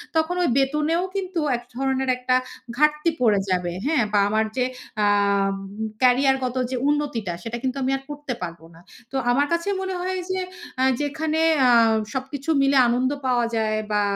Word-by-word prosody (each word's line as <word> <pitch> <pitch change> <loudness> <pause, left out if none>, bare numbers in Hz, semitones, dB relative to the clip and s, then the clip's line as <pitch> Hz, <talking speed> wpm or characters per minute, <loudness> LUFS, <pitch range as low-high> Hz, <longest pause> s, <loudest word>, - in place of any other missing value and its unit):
তখন 320 +3 +1
ওই - - +2
বেতনেও 300 +5 +1
কিন্তু 375 -3 -2 0.2
এক 240 - -11
ধরনের 265 0 -1
একটা 255 0 +1 0.4
ঘাটতি 300 +2 +3
পড়ে 210 -4 +4
যাবে। 180 -1 0
হ্যাঁ? 290 -6 +2
বা 205 - +4
আমার 220 +1 +1 0.5
অ্যা 205 - +3 0.5
উ - - -9 0.4
ক্যারিয়ারগত 255 0 +3 0.2
যে - - -1
উন্নতিটা। 285 -11 -1
সেটা 230 +1 -4
কিন্তু 260 +1 -1
আমি 260 - 0
আর 270 - -13
করতে 290 -3 -5
পারবো 170 -1 -7
না। 165 - -16 0.3
তো 270 - -7 0.2
আমার 285 +4 +2
কাছে 335 +3 -1
মনে 380 -1 -3
হয় 370 +1 -2
যে, 375 - -1 0.4
আ - - +3 0.2
যেখানে 310 +2 -1 0.2
অ্যা 250 -2 +5 0.4
সবকিছু 270 +3 -5
মিলে 275 0 +3
আনন্দ 250 +2 +1
পাওয়া 245 -2 +2
যায় 215 -1 0
বা 210 0 +2
265 Hz, 170 wpm, -23 LUFS, 240-300 Hz, 0.5 s, অ্যা